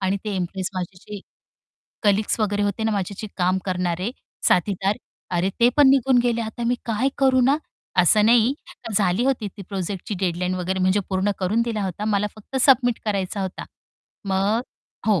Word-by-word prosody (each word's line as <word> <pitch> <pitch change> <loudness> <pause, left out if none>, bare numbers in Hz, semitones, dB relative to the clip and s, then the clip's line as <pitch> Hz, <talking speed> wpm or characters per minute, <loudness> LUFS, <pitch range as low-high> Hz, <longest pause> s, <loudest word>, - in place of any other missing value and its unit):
आणि 190 +1 +1
ते 210 - -2
इम्प्रेस 185 +1 -3
माझे 180 0 -4
जे 205 0 -8 0.8
कलीग्स 210 +1 +2
वगैरे 205 -1 +1
होते 205 +2 -1
ना 220 - +2
माझ्याशी 200 +2 -3
काम 185 0 +2
करणारे 180 +2 -1 0.4
साथीदार. 195 +2 +1 0.3
अरे 180 +2 +1
ते 235 - +7
पण 290 -2 +7
निघून 265 -1 +4
गेले 235 -1 +1
आता 225 +1 -4
मी 245 +1 +2
काय 235 +3 +1
करू 265 -2 +4
ना? 275 +3 +4 0.4
असं 210 +4 +4
नाही 235 +1 +5 0.3
तर 225 - -4
झाली 195 +3 +2
होती 265 -5 0
ती 200 - -7
प्रोजेक्टची 195 +1 -4
डेडलाईन 180 0 -1
वगैरे 185 +1 -2
म्हणजे 185 +2 +3
पूर्ण 190 +1 +1
करून 200 +5 +1
दिला 225 -3 -2
होता 190 +2 -4
मला 210 -1 +1
फक्त 215 +5 -8
सबमिट 245 -2 +4
करायचा 200 -1 -2
होता. 190 -1 -5 0.6
मग 195 +3 +1 0.5
हो. 210 -5 +3
205 Hz, 175 wpm, -23 LUFS, 185-225 Hz, 0.8 s, ते